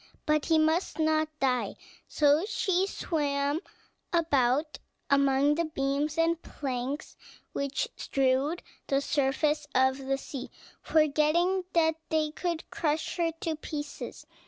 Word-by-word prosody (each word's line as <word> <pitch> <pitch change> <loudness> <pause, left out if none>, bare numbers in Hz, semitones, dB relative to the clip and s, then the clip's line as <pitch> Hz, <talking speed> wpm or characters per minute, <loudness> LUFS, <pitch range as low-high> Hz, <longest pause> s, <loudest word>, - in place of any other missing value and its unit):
But 305 -1 +2
he 325 - +4
must 315 +1 +1
not 315 -1 +2
die. 255 -2 +1 0.3
So 295 +2 +3
she 380 -3 +1
swam 285 -4 -1 0.5
about 300 -3 +2 0.3
among 280 +1 +4
the 335 +2 0
beams 290 +1 -1
and 330 0 +2
planks 265 +1 -4 0.4
which 280 - -1
strewed 270 +5 0 0.2
the 275 - +2
surface 295 +2 +1
of 260 +1 +3
the 270 0 +1
sea, 270 -1 -7 0.3
forgetting 320 +5 +2
that 320 -1 +3
they 310 -1 +1
could 335 0 -3
crush 310 +1 -1
her 335 -1 +1
to 325 -1 -1
pieces. 295 -1 -6
300 Hz, 120 wpm, -29 LUFS, 280-320 Hz, 0.5 s, he